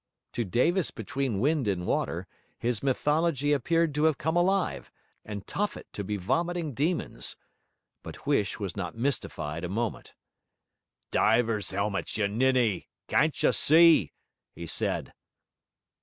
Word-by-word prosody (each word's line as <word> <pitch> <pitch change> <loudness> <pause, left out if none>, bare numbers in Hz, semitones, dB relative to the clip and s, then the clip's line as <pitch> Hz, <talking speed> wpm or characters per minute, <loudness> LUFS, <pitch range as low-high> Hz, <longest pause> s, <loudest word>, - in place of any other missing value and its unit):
To 120 - -1
Davis 160 - +1
between 135 -8 -3
wind 145 0 +1
and 90 -3 -1
water, - - -1 0.3
his 120 -2 -1
mythology 145 +2 +1
appeared 165 +3 +1
to 150 +2 +1
have 160 -3 +3
come 160 +2 -1
alive, 190 +2 +1 0.3
and 105 -2 -7
Tophet 205 +1 -3
to 100 - -4
be 105 +1 -3
vomiting 165 - -1
demons. 160 +8 -2 0.6
But - - -10
Huish 140 -9 +1
was 100 -4 -4
not 90 -1 -5
mystified 85 - -2
a 90 - -3
moment. 110 +2 -3 1.0
'Divers' 115 -1 +2
'elmets, 100 +1 -2
you 105 -2 +2
ninny. 120 -2 +1 0.2
Can't 155 +1 +1
you - - +5
see?' 160 - +6 0.4
he 85 - -7
said. - - -2
130 Hz, 130 wpm, -28 LUFS, 105-160 Hz, 1.0 s, see